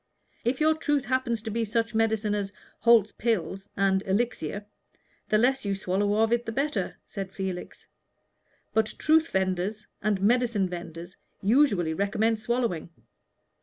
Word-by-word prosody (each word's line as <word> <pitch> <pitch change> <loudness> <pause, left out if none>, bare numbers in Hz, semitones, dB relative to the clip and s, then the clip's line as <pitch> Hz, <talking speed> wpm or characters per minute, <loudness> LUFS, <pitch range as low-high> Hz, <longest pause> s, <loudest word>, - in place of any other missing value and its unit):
"If 245 +3 0
your 310 +1 +4
truth 295 -3 0
happens 245 -4 0
to 220 - -4
be 230 +2 0
such 225 +1 -1
medicine 220 -1 +1
as 200 -1 -2 0.3
Holt's 225 -2 +5
Pills 195 -3 -2
and 195 -1 +3
Elixir, 205 -2 -1 0.6
the 215 - +4
less 265 +4 +2
you 200 -1 -1
swallow 195 +2 0
of 225 +1 +2
it 235 0 +1
the - - -1
better," 265 -6 -1
said 195 -1 -6
Felix. 190 -2 -5 0.9
"But 220 -1 +1
truth 320 +1 +4
vendors 190 +3 -1 0.2
and 205 -1 +1
medicine 225 -1 +2
vendors 175 0 -8 0.3
usually 200 - +3
recommend 210 +5 +1
swallowing. 225 -8 -1
215 Hz, 140 wpm, -27 LUFS, 195-235 Hz, 0.9 s, Holt's